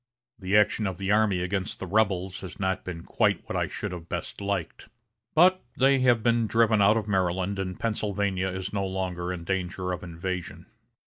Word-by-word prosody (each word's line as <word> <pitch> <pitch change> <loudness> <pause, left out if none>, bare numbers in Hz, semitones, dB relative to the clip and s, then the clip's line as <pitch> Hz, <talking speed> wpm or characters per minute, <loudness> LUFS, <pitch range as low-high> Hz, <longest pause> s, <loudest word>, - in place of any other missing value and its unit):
The 95 +2 +2
action 105 0 +3
of 95 -2 -4
the 95 +1 -1
army 105 -4 +3
against 95 +1 -2
the - - -5
rebels 95 -2 0
has 90 -4 -9
not 95 -1 -1
been 85 -2 -6
quite - - +1
what - - -4
I - - +1
should - - -5
have 85 -2 -8
best - - -5
liked. 100 -4 -3 0.5
But 185 +3 +5
they 135 +1 +4
have 120 -3 +3
been 115 -1 +2
driven 110 0 +3
out 105 +3 +5
of 110 -2 -2
Maryland, 95 0 0
and 90 -1 -4
Pennsylvania 100 -4 -1
is 95 +1 -5
no 100 -1 0
longer 90 -2 -3
in 90 -2 -5
danger 90 0 -2
of 90 - -3
invasion. 90 +1 -5
95 Hz, 190 wpm, -27 LUFS, 90-105 Hz, 0.5 s, But